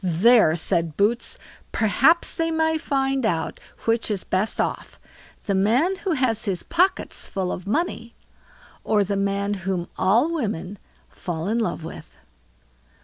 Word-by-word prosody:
"There", 185 Hz, 0 st, +5 dB
said 165 Hz, -1 st, -1 dB
Boots, 225 Hz, +4 st, 0 dB, 0.3 s
"perhaps 270 Hz, +10 st, +3 dB
they 330 Hz, 0 st, +2 dB
may 320 Hz, 0 st, +1 dB
find 270 Hz, -3 st, 0 dB
out 170 Hz, -7 st, -1 dB, 0.3 s
which 225 Hz, 0 st, +1 dB
is 205 Hz, -3 st, -2 dB
best 195 Hz, +4 st, -1 dB
off, -, -, -3 dB, 0.5 s
the 200 Hz, -, 0 dB
man 235 Hz, -, +2 dB
who 380 Hz, -3 st, -2 dB
has 245 Hz, -6 st, 0 dB
his 190 Hz, -4 st, -2 dB
pockets 360 Hz, +3 st, 0 dB
full 190 Hz, -2 st, -2 dB
of 180 Hz, -, -6 dB
money, 235 Hz, -, -2 dB, 0.7 s
or 210 Hz, -2 st, +2 dB
the 200 Hz, +1 st, -2 dB
man 200 Hz, +1 st, 0 dB
whom 185 Hz, -2 st, -3 dB
all 230 Hz, -, +3 dB
women 205 Hz, -, -3 dB, 0.3 s
fall 170 Hz, -1 st, -5 dB
in 225 Hz, +3 st, 0 dB
love 175 Hz, -7 st, -2 dB
with." 160 Hz, -, -10 dB
210 Hz, 145 wpm, -23 LUFS, 190-270 Hz, 0.7 s, There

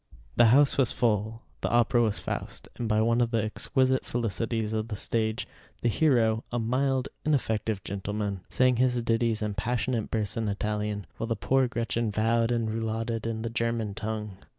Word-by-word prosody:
The 120 Hz, -, +6 dB
house 140 Hz, +4 st, +5 dB
was 130 Hz, -4 st, +4 dB
full: 110 Hz, -1 st, 0 dB, 0.2 s
the -, -, 0 dB
opera 120 Hz, 0 st, +3 dB
was 110 Hz, -3 st, +2 dB
"Faust," -, -, -5 dB
and 115 Hz, -2 st, -3 dB
by 110 Hz, 0 st, +3 dB
one 115 Hz, +2 st, +3 dB
of 120 Hz, -, +2 dB
the 115 Hz, -2 st, +1 dB
exquisite 130 Hz, +4 st, +1 dB
felicities 115 Hz, -1 st, -2 dB
of 110 Hz, 0 st, -1 dB
the 110 Hz, -, -4 dB
stage, 110 Hz, +2 st, -1 dB, 0.4 s
the 120 Hz, -, +3 dB
hero, 115 Hz, -5 st, +2 dB
a 120 Hz, -, -1 dB
mild, 130 Hz, +3 st, 0 dB
ineffective 110 Hz, -8 st, 0 dB
gentleman, 100 Hz, 0 st, -3 dB
sang 130 Hz, -1 st, +3 dB
his 125 Hz, 0 st, +2 dB
ditties 115 Hz, -1 st, +1 dB
and 105 Hz, -1 st, -2 dB
passionate 115 Hz, +1 st, -1 dB
bursts 110 Hz, +1 st, -2 dB
in 110 Hz, -2 st, 0 dB
Italian, 105 Hz, 0 st, -2 dB
while 115 Hz, -, -3 dB
the 115 Hz, -, 0 dB
poor 130 Hz, +4 st, +2 dB
Gretchen 115 Hz, -1 st, -1 dB
vowed 115 Hz, +2 st, +2 dB
and 115 Hz, -2 st, 0 dB
rouladed 115 Hz, 0 st, -2 dB
in 110 Hz, -1 st, -3 dB
the 115 Hz, -, -3 dB
German 115 Hz, -3 st, -1 dB
tongue. 105 Hz, -2 st, -4 dB
115 Hz, 175 wpm, -28 LUFS, 110-120 Hz, 0.4 s, The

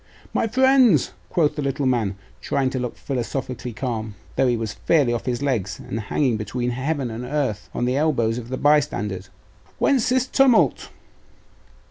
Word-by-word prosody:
'My -, -, +1 dB
friends,' 255 Hz, -, +4 dB, 0.2 s
quoth 155 Hz, -4 st, +1 dB
the 150 Hz, -, -2 dB
little 140 Hz, 0 st, -1 dB
man, 115 Hz, -6 st, +1 dB, 0.3 s
trying 135 Hz, -2 st, 0 dB
to 130 Hz, -, -2 dB
look 125 Hz, -1 st, -4 dB
philosophically 125 Hz, -2 st, -4 dB
calm, 110 Hz, -3 st, -4 dB, 0.2 s
though 135 Hz, -, +3 dB
he 120 Hz, -1 st, +2 dB
was 110 Hz, -2 st, -3 dB
fairly 140 Hz, -7 st, +2 dB
off 120 Hz, -, -4 dB
his 125 Hz, +2 st, -1 dB
legs, 105 Hz, -10 st, -1 dB
and 115 Hz, -, -5 dB
hanging 115 Hz, +3 st, 0 dB
between 120 Hz, +4 st, -2 dB
heaven 135 Hz, 0 st, -2 dB
and 115 Hz, +2 st, -5 dB
earth 125 Hz, -6 st, -2 dB
on 120 Hz, -, -2 dB
the 125 Hz, +2 st, +1 dB
elbows 125 Hz, -7 st, +1 dB
of 120 Hz, 0 st, -9 dB
the 130 Hz, -, -3 dB
bystanders, 115 Hz, -11 st, +1 dB, 0.5 s
'whence 265 Hz, -6 st, +2 dB
this 255 Hz, 0 st, +2 dB
tumult? 265 Hz, -2 st, +3 dB
130 Hz, 165 wpm, -23 LUFS, 115-150 Hz, 0.5 s, friends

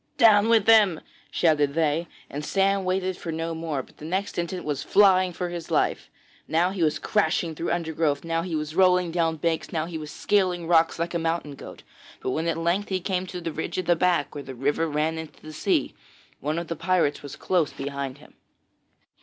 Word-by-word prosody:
'Down 220 Hz, -3 st, +6 dB
with 225 Hz, -3 st, +4 dB
him,' 210 Hz, -7 st, +5 dB, 0.3 s
shouted 150 Hz, -4 st, +2 dB
they; 165 Hz, +1 st, +1 dB, 0.2 s
and 145 Hz, +1 st, -6 dB
Sam 195 Hz, +3 st, +1 dB
waited 185 Hz, 0 st, -1 dB
for 165 Hz, -, -5 dB
no 165 Hz, +1 st, -3 dB
more, 160 Hz, -4 st, -3 dB
but -, -, -22 dB
the -, -, -13 dB
next 190 Hz, +3 st, -2 dB
instant 175 Hz, +1 st, -3 dB
was 145 Hz, -2 st, -2 dB
flying 185 Hz, -2 st, +4 dB
for 175 Hz, +1 st, -4 dB
his 170 Hz, -2 st, -6 dB
life. -, -, 0 dB, 0.4 s
Now 170 Hz, +3 st, +2 dB
he 190 Hz, -2 st, -4 dB
was 155 Hz, -2 st, +2 dB
crashing 170 Hz, -5 st, 0 dB
through 165 Hz, +2 st, -4 dB
undergrowth, 160 Hz, -4 st, 0 dB
now 165 Hz, 0 st, -1 dB
he 170 Hz, -1 st, -3 dB
was 155 Hz, 0 st, -3 dB
rolling 180 Hz, -2 st, +4 dB
down 165 Hz, -1 st, +1 dB
banks, 165 Hz, +1 st, -1 dB
now 160 Hz, -1 st, -1 dB
he 165 Hz, -1 st, -6 dB
was 150 Hz, -1 st, -7 dB
scaling 180 Hz, -1 st, 0 dB
rocks 165 Hz, -1 st, +3 dB
like 170 Hz, +1 st, -2 dB
a 170 Hz, -, 0 dB
mountain 165 Hz, -2 st, -2 dB
goat; 140 Hz, -, -11 dB, 0.4 s
but 130 Hz, -, -3 dB
when 160 Hz, +5 st, -1 dB
at 165 Hz, -1 st, 0 dB
length 170 Hz, +5 st, 0 dB
he 190 Hz, -1 st, 0 dB
came 185 Hz, 0 st, -2 dB
to 180 Hz, -1 st, -6 dB
the 165 Hz, -1 st, -4 dB
ridge 160 Hz, -, -4 dB
at 185 Hz, -, -1 dB
the 175 Hz, -, +4 dB
back, 170 Hz, -4 st, +1 dB
where 145 Hz, -, -6 dB
the 130 Hz, -, -8 dB
river 145 Hz, +6 st, 0 dB
ran 155 Hz, +2 st, -1 dB
into 160 Hz, -2 st, -9 dB
the 155 Hz, -, -11 dB
sea, -, -, 0 dB, 0.5 s
one 150 Hz, +3 st, -2 dB
of 170 Hz, 0 st, -3 dB
the 165 Hz, -, -3 dB
pirates 170 Hz, -3 st, +1 dB
was 145 Hz, -, -8 dB
close 175 Hz, -5 st, 0 dB
behind 140 Hz, -1 st, -5 dB
him. 150 Hz, -, -18 dB
165 Hz, 210 wpm, -25 LUFS, 155-185 Hz, 0.5 s, Down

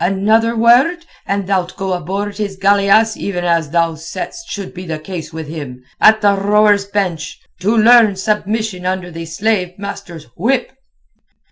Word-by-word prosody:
Another 215 Hz, +5 st, +2 dB
word 255 Hz, +10 st, +3 dB, 0.2 s
and 200 Hz, -1 st, -1 dB
thou'lt 185 Hz, -2 st, -1 dB
go 190 Hz, -1 st, -2 dB
aboard 195 Hz, +4 st, -4 dB
his 200 Hz, -2 st, -3 dB
galeasse 200 Hz, +3 st, +3 dB
even 180 Hz, -3 st, -3 dB
as 170 Hz, -3 st, +1 dB
thou 165 Hz, +1 st, +1 dB
saidst 185 Hz, -, -7 dB
should 200 Hz, -2 st, -6 dB
be 185 Hz, 0 st, -9 dB
the 160 Hz, -1 st, -3 dB
case 165 Hz, +1 st, -7 dB
with 160 Hz, -1 st, -7 dB
him—at 145 Hz, +8 st, 0 dB
the 205 Hz, -1 st, +4 dB
rowers' 205 Hz, 0 st, +3 dB
bench, 185 Hz, -6 st, -3 dB, 0.2 s
to 210 Hz, +5 st, +1 dB
learn 225 Hz, -2 st, +6 dB
submission 210 Hz, 0 st, -2 dB
under 185 Hz, -1 st, -3 dB
the 165 Hz, 0 st, -7 dB
slave 180 Hz, +1 st, -1 dB
master's 200 Hz, -5 st, -8 dB
whip." 245 Hz, +9 st, 0 dB
195 Hz, 150 wpm, -16 LUFS, 175-215 Hz, 0.2 s, learn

